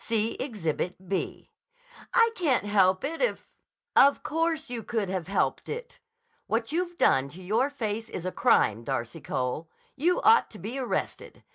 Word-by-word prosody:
See 225 0 +1
Exhibit 185 - -3
B." 195 - -3 0.6
"I 460 0 +5
can't 300 - +1
help 190 -1 +3
it 320 +4 -3
if—" - - 0 0.5
"Of 280 +1 +6
course 325 0 -1
you 240 -2 -3
could 220 -3 -2
have 185 -3 -3
helped 200 - 0
it! 480 +1 -6 0.5
What 225 +3 -1
you've 350 +1 -2
done 135 +1 +3
to 180 +6 -11
your 225 +9 +1
face 225 -5 -4
is 180 - -6
a 185 - -1
crime, 115 - +3
Darcy 135 +4 -3
Cole! 130 +6 -3 0.3
You 345 +6 +2
ought 450 +2 +6
to 215 - -11
be 230 +7 -5
arrested! 255 - -4
225 Hz, 160 wpm, -27 LUFS, 185-290 Hz, 0.6 s, Of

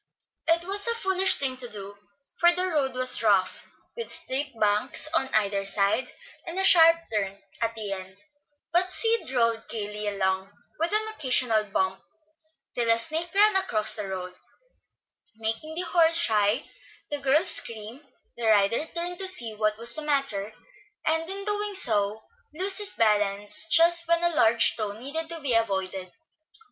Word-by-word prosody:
It 335 +1 +2
was 400 +4 -2
a 465 - +1
foolish 380 -3 +3
thing 260 -2 -2
to 250 -2 -5
do, 200 -1 -8 0.4
for 345 0 +5
the 365 +1 -1
road 290 -5 -1
was 255 0 +3
rough, 195 -4 0 0.3
with 465 -1 -7
steep 265 -2 -3
banks 210 +7 +1
on 325 -5 +1
either 200 -2 0
side, 200 +5 0 0.4
and 335 +2 -6
a 385 - +2
sharp 330 -4 +7 0.2
turn 200 -2 -3 0.2
at 230 0 -2
the 215 -3 -6
end; 190 -1 -8 0.6
but 365 +2 +2
Sid 455 - 0
rolled 230 -3 -1
gayly 210 -1 -5
along, 190 -1 -2 0.3
with 330 +3 -1
an 430 +1 0
occasional 250 - +2
bump, 190 -1 -2 0.7
till 235 -2 -1
a 230 - +5
snake 315 +9 -1
ran 420 0 +5
across 215 - +2
the 210 -2 -3
road, 185 -1 -6 1.0
making 225 +8 -4
the 350 - -2
horse 335 -2 +2
shy, 215 -2 +1 0.4
the 290 - 0
girls 295 +7 +2
scream, 230 +5 -7 0.3
the 235 -1 -3
rider 215 +7 +2
turn 350 +1 -2
to 385 - +2
see 240 -12 +3
what 215 0 -1
was 235 +1 -3
the 310 - -6
matter, 275 -9 -2 0.5
and 320 +1 0
in 395 +1 -6
doing 415 -1 -1
so 215 - +1 0.3
lose 380 +3 +4
his 410 -2 -1
balance 210 +3 +1
just 335 +1 +4
when 335 0 +1
a 345 - +3
large 230 -6 +3
stone 210 -1 -6
needed 320 +6 -3
to 335 -1 -6
be 275 -4 0
avoided. 190 -4 -1
245 Hz, 165 wpm, -25 LUFS, 210-335 Hz, 1.0 s, sharp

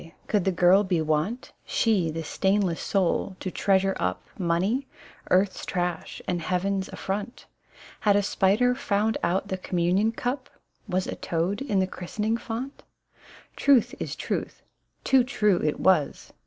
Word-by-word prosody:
Could 205 -4 0
the 190 - +3
girl 180 +3 +5
be 185 -4 0
wont 155 +10 -1
(She 200 -8 +1
the 160 +1 -4
stainless 190 +2 0
soul) 190 0 0
to 185 - -4
treasure 195 +1 +2
up 90 0 -1
Money, 190 +9 0 0.4
earth's 185 +1 +2
trash 175 -3 -3
and 175 -2 -1
heaven's 190 +2 -1
affront? 205 +4 -5 0.5
Had 205 -1 +3
a 205 - +4
Bpider 210 +6 +2
found 220 -4 0
out 190 +3 0
the 190 - -2
communion 185 +5 +1
cup, 250 +3 -3 0.4
Was 185 0 0
a - - -4
toad 175 +7 -2
in 250 -8 -1
the 190 - +3
christening 210 +5 -3
font? 240 +4 -6 0.7
Truth 270 -5 +4
is - - -4
truth: - - -4 0.4
too 265 -2 +4
true 210 -7 +1
it 150 - 0
was. 180 -7 +1
195 Hz, 145 wpm, -26 LUFS, 180-215 Hz, 0.7 s, girl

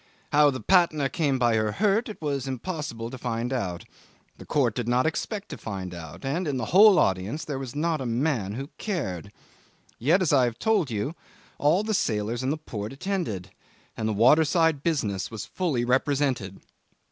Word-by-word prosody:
How 150 0 +6
the 130 -2 -3
Patna 165 -7 +3
came 145 -5 0
by 120 -2 +2
her 110 -1 0
hurt 215 +3 +1
it 215 - -8
was 140 -3 -2
impossible 130 -4 -4
to 130 - -8
find 120 +1 -2
out; 90 -9 -3 0.5
the - - -11
court 130 -7 +2
did 120 0 -3
not 125 +3 +2
expect 200 +6 -3
to - - -7
find 95 -4 -5
out; 80 - -9
and 160 +6 -1
in 140 -3 -1
the 125 - -2
whole 205 +1 +8
audience 95 - 0
there 140 -3 -4
was 130 -2 -7
not 155 0 0
a 130 - -3
man 120 -4 0
who 135 +6 -6
cared. 100 - -3 0.7
Yet, 165 - +3
as 160 - +1
I've 125 -4 +3
told 215 -9 +1
you, 110 +7 -2 0.5
all 160 +8 +3
the 215 0 -1
sailors 110 - 0
in 130 - -1
the 150 - 0
port 110 -8 -6
attended, 135 - -3 0.4
and 110 0 -2
the - - 0
waterside 155 - +4
business 115 - -1
was 110 -2 -6
fully 150 -10 -1
represented. 130 -6 0
135 Hz, 180 wpm, -26 LUFS, 115-160 Hz, 0.7 s, whole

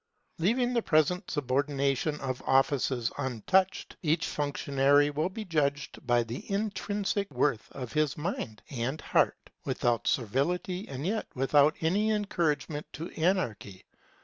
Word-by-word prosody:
Leaving 240 +8 +2
the 235 - +2
present 170 +2 +2
subordination 140 +1 0
of 130 -2 -3
offices 130 -2 +2
untouched, 145 - +1
each 160 0 +1
functionary 145 0 +2
will 155 +5 0
be 215 +3 -6
judged 145 -5 -1
by 120 -1 +4
the 115 - -7
intrinsic 205 -1 -1
worth 130 -3 0
of 125 -4 -7
his 155 -2 +1
mind 150 - -4
and 130 +3 -2
heart, - - +1
without 120 -3 0
servility 175 - 0
and 135 +2 -5
yet 215 +4 -1
without 145 +3 +4
any 195 +7 +2
encouragement 165 -8 -1
to 165 +3 -6
anarchy. 120 - -1
145 Hz, 125 wpm, -29 LUFS, 135-180 Hz, -, by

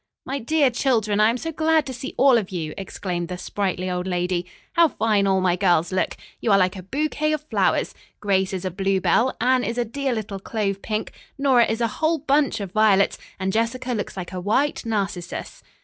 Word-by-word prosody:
"My 275 +1 -3
dear 280 +2 +2
children, 225 -5 +1
I 215 +1 +5
am 235 - 0
so 325 +6 -4
glad 315 -1 +2
to 260 - -5
see 260 +2 -7
all 260 -2 +6
of 200 - -6
you!" 160 -5 -4
exclaimed 180 -2 -4
the 180 0 -5
sprightly 185 -1 -2
old 180 0 -2
lady. 180 -1 -1 0.3
"How 335 0 +5
fine 215 -7 +1
all 190 -1 +2
my 180 -1 +2
girls 175 -3 +2
look. 185 - -1 0.2
You 225 - 0
are 200 - +6
like 185 0 +2
a 190 - -6
bouquet 305 - -1
of 305 -1 -2
flowers. - - +1 0.3
Grace 190 -2 +1
is 190 -1 -4
a 185 - -1
bluebell, 195 +7 +1
Anne 255 +1 +3
is 235 +2 -3
a 240 - +1
dear 270 +4 -2
little 210 -3 -4
clove 200 -1 -2
pink, 215 0 -3 0.3
Nora 265 -4 +4
is 225 +2 -2
a 230 - +3
whole 320 +1 +3
bunch 285 -2 +1
of 195 -3 -5
violets 205 -2 +3 0.2
and 190 0 -1
Jessica 240 +3 -1
looks 205 -3 -4
like 180 -1 -5
a 185 - -3
white 235 +6 0
narcissus." 195 -5 -3
215 Hz, 210 wpm, -23 LUFS, 190-260 Hz, 0.3 s, all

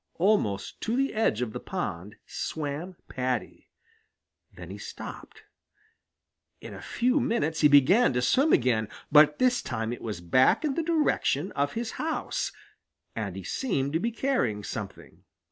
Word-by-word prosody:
Almost 165 - +1
to 225 - -1
the 275 +1 +1
edge 170 - +1
of 110 -3 -5
the - - -4
pond 95 +6 -5
swam 155 +4 -4
Paddy. 130 -1 -3 0.8
Then - - -10
he - - -8
stopped. - - -9 1.2
In - - -9
a - - -9
few 250 +1 +1
minutes 160 -9 0
he 150 - +8
began 145 - +5
to 125 - +1
swim 270 - +3
again, 115 -4 +2 0.2
but 150 0 +6
this 250 -1 +2
time 115 -2 -3
it - - -8
was 105 -6 -4
back 130 - +3
in 290 - 0
the 335 - -1
direction 305 - +1
of 140 0 -1
his 235 0 -3
house, 320 +1 -2 0.6
and - - -4
he - - -7
seemed 145 - -1
to 160 - +2
be 230 - 0
carrying 220 - 0
something. - - -8
150 Hz, 155 wpm, -27 LUFS, -, 1.2 s, he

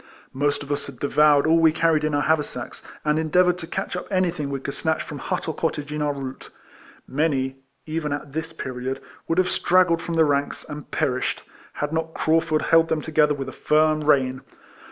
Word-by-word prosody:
Most 145 +2 0
of 145 - -8
us 145 0 -2
had 140 -3 -10
devoured 145 +1 +4
all 165 +1 +4
we 165 -1 +5
carried 160 -1 +2
in 155 -1 0
our 145 - +1
haver 160 -1 +3
sacks, - - -7 0.2
and 150 +1 +2
endeavoured 180 +3 +3
to 165 - -6
catch 175 - -3
up 180 - -5
anything 180 -7 0
we 140 -1 -3
could 140 +1 -5
snatch 160 -1 -1
from 145 - -8
hut - - -3
or 160 - -1
cottage 150 -2 -3
in 150 - -3
our 150 -1 +1
route. 135 -2 -7 0.6
Many, 135 -2 0 0.3
even 155 -1 -3
at 145 -1 -5
this 160 +1 -3
period, 130 -4 -4 0.3
would 165 - 0
have 185 0 +4
straggled 175 -2 +3
from 170 - -4
the 160 -1 +5
ranks, 145 -1 -1
and 150 -1 -8
perished, 125 -1 -1 0.3
had 145 +1 -3
not 160 0 -2
Craufurd 155 -1 +1
held 165 0 +4
them 155 - 0
to 160 - -7
gether 150 -1 +4
with 135 -1 -5
a - - -5
firm 155 +1 +2
rein. 130 -3 +2
150 Hz, 210 wpm, -23 LUFS, 145-160 Hz, 0.6 s, we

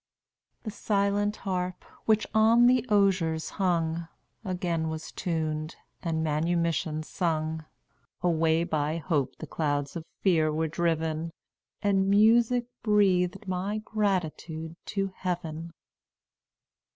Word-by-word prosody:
"The 215 - -4
silent 205 -1 0
harp, 180 -2 -3 0.2
which 220 -1 +3
on 225 +2 +6
the 250 0 +5
osiers 185 -6 +2
hung, 170 -3 0 0.4
Again 175 -4 -1
was 160 0 -6
tuned, 155 -2 -2 0.3
and 160 -2 -1
manumission 160 0 0
sung; 160 -2 -2 0.6
Away 165 -1 +3
by 155 -1 -1
hope 145 -6 -1
the - - -8
clouds 145 -3 -2
of 170 - -4 0.2
fear 160 -5 +3
were 160 +1 0
driven, 160 0 -1 0.5
And 195 -1 +2
music 230 +4 +4 0.2
breathed 195 -2 +2
my 185 +3 -1
gratitude 170 -6 -2
to 195 -2 -2
Heaven." 170 -2 -4
170 Hz, 105 wpm, -28 LUFS, 160-200 Hz, 0.6 s, on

